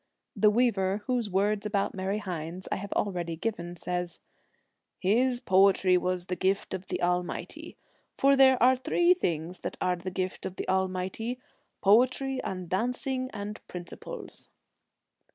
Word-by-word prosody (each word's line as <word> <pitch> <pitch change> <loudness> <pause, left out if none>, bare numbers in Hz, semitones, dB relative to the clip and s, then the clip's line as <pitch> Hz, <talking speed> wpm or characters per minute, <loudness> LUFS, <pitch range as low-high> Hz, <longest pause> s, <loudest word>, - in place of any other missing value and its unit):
The 210 - +5
weaver 210 -3 +1
whose 245 -4 0
words 200 +2 +1
about 205 -2 0
Mary 190 +2 -2
Hynes 180 -2 -5
I - - +1
have 200 +1 -7
already 175 -4 -1
given, 175 -2 -4
says, 180 0 -4 0.4
' - - -50
His 245 +3 +3
poetry 190 -4 +4
was 180 0 0
the 180 - -3
gift 190 +2 0
of 190 0 -5
the - - -3
Almighty, 180 0 -2 0.4
for 275 +1 +5
there 265 -1 +6
are 260 +1 +6
three 345 +7 +3
things 175 - -3
that - - -5
are 180 0 +1
the 180 +1 -6
gift 185 0 -3
of 185 - -5
the - - -5
Almighty 190 +6 -1 0.2
— - - -45
poetry 255 +5 +3
and 185 -2 -5
dancing 250 +6 -1
and 210 0 -6
principles. 175 -1 -9
195 Hz, 150 wpm, -28 LUFS, 180-235 Hz, 0.4 s, there